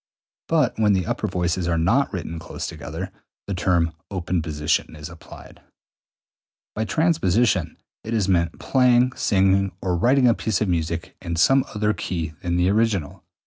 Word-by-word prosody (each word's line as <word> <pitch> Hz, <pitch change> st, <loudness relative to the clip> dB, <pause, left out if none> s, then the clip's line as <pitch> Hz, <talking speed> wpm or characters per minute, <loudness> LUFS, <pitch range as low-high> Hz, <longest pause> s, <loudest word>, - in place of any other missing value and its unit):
But 150 Hz, -9 st, +1 dB
when 105 Hz, -2 st, +4 dB
the 95 Hz, -3 st, 0 dB
upper -, -, -2 dB
voices 90 Hz, 0 st, -1 dB
are 85 Hz, -1 st, +1 dB
not 105 Hz, +13 st, +2 dB
written 85 Hz, -3 st, -5 dB
close -, -, -6 dB
together, 85 Hz, +5 st, -6 dB, 0.3 s
the 100 Hz, -, -4 dB
term 85 Hz, -2 st, +1 dB, 0.2 s
open 90 Hz, -2 st, -2 dB
position 75 Hz, -1 st, -1 dB
is 75 Hz, +1 st, -8 dB
applied. 85 Hz, -1 st, -13 dB
215. -, -, -27 dB, 1.1 s
By 110 Hz, -, -2 dB
transposition 115 Hz, -, +1 dB, 0.3 s
is 110 Hz, -3 st, -1 dB
meant 85 Hz, -3 st, +1 dB
playing, 125 Hz, -1 st, +3 dB
singing, 95 Hz, -1 st, +2 dB
or 90 Hz, -2 st, -1 dB
writing 125 Hz, +8 st, +3 dB
a 120 Hz, -, +5 dB
piece 110 Hz, -4 st, -1 dB
of 105 Hz, -, 0 dB
music 85 Hz, -1 st, -2 dB
in 85 Hz, -2 st, -4 dB
some 135 Hz, +11 st, +4 dB
other 105 Hz, 0 st, +1 dB
key 85 Hz, -5 st, -4 dB
than 85 Hz, -2 st, -1 dB
the 90 Hz, +1 st, +2 dB
original. 105 Hz, -8 st, 0 dB
95 Hz, 160 wpm, -23 LUFS, 85-110 Hz, 1.1 s, a